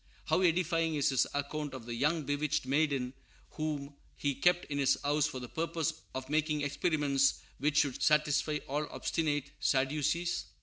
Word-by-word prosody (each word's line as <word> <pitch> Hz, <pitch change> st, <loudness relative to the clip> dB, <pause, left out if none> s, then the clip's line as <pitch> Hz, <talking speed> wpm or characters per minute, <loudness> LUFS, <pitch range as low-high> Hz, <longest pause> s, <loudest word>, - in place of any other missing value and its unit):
How -, -, +2 dB
edifying 165 Hz, -2 st, +2 dB
is 145 Hz, 0 st, +2 dB
his 135 Hz, -2 st, +2 dB
account 145 Hz, 0 st, -3 dB
of 125 Hz, -3 st, -8 dB
the 120 Hz, -, -5 dB
young 150 Hz, +6 st, +1 dB
bewitched 145 Hz, +1 st, -1 dB
maiden 135 Hz, -2 st, +1 dB, 0.4 s
whom 150 Hz, -2 st, -3 dB, 0.2 s
he 140 Hz, -1 st, 0 dB
kept 175 Hz, +6 st, +2 dB
in 145 Hz, -1 st, -3 dB
his 140 Hz, 0 st, +3 dB
house 145 Hz, +1 st, +2 dB
for 140 Hz, -5 st, -5 dB
the 125 Hz, -, -7 dB
purpose 165 Hz, +2 st, -1 dB, 0.2 s
of 130 Hz, 0 st, -4 dB
making 150 Hz, +1 st, +1 dB
experiments 145 Hz, -2 st, +2 dB, 0.2 s
which 145 Hz, +1 st, +1 dB
should 140 Hz, -4 st, +2 dB
satisfy 150 Hz, 0 st, +3 dB
all 150 Hz, +2 st, -1 dB
"obstinate 145 Hz, -3 st, -1 dB
Sadducees"! 150 Hz, +5 st, +1 dB
145 Hz, 160 wpm, -32 LUFS, 140-155 Hz, 0.4 s, his